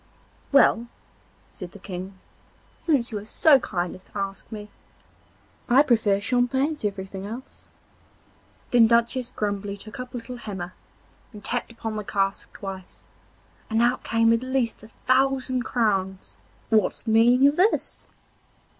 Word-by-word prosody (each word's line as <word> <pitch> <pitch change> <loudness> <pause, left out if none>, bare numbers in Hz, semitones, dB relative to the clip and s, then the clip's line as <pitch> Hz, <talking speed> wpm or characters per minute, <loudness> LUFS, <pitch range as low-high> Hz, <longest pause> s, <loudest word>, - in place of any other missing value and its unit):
'Well,' 240 -4 +5 0.6
said 180 -1 -9
the - - -10
King, 190 0 -7 0.6
'since 275 -8 +1
you 210 - -3
are - - -10
so 275 +6 +5
kind 175 -6 -3
as 185 - -12
to - - -11
ask 195 0 -4
me, 210 -1 -8 1.0
I 260 +4 +6
prefer 220 -7 +2
champagne 255 +7 +1
to 210 -7 -1
anything 190 0 -7
else.' 245 +5 -9 1.0
Then 235 -2 +6
Duchess 235 +2 +2
Grumbly 205 -1 -3
took 215 +6 -10
up 250 0 -7
a - - -1
little 245 +1 -7
hammer 190 -6 -6 0.6
and 210 -2 -12
tapped 245 -1 -2
upon 225 -2 -5
the 210 - -3
cask 195 -1 -1
twice, 190 -2 -9 0.7
and 220 -1 +1
out 240 +2 +2
came 230 0 +3
at 230 - +1
least 255 -3 -1
a 220 - -12
thousand 260 +1 +1
crowns. 195 -5 -1 0.4
'What's 220 -1 +2
the 225 - -1
meaning 240 +4 +6
of 285 - +1
this? 395 +5 +1
225 Hz, 145 wpm, -25 LUFS, 200-250 Hz, 1.0 s, I